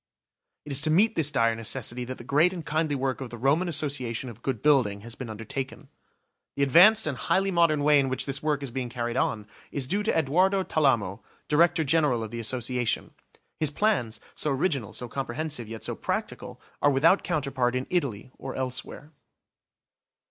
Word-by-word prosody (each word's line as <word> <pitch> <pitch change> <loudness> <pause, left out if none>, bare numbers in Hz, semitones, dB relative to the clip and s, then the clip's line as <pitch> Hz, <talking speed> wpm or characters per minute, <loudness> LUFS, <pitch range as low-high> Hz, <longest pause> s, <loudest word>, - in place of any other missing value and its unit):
It 150 - -7
is 140 0 +2
to 155 - +1
meet 205 +8 +4
this 160 -7 +1
dire 115 -6 +2
necessity 120 +2 -3
that 130 +1 -6
the - - -10
great 150 +8 +3
and 170 -4 -7
kindly 155 -1 0
work 135 0 -2
of 130 - -5
the 120 - -8
Roman 140 +9 +2
Association 140 -6 -2
of 115 0 -15
Good 130 -4 -3
Building 125 -9 +3
has 115 +2 -9
been 125 -1 -7
undertaken. 115 +5 -6 0.7
The 140 - +1
advanced 195 +11 +6
and 150 - -2
highly 190 +8 +1
modern 165 -4 +3
way 150 0 +5
in 135 -1 +1
which 130 0 -2
this 140 0 -3
work 150 -2 0
is 135 - -5
being 125 -1 -3
carried 120 -1 -3
on 110 -4 0 0.3
is 135 -3 -3
due 200 +8 0
to 210 - 0
Edoardo 185 +6 +2
Talamo, 115 - +1 0.3
Director 165 +2 +3
General 145 -6 +2
of 110 - -7
the 120 - -5
Association. 120 0 -1 0.5
His 155 - +2
plans, 140 - 0
so 150 - -2
original, 135 - -1
so 125 - -5
comprehensive, 135 0 -4
yet 110 0 -8
so - - -2
practical, - - -4 0.2
are 145 - +5
without 155 +8 +4
counterpart 135 -7 -1
in 130 +1 -1
Italy 130 - -2
or 135 0 -6
elsewhere. 130 +3 -4
135 Hz, 185 wpm, -27 LUFS, 120-155 Hz, 0.7 s, advanced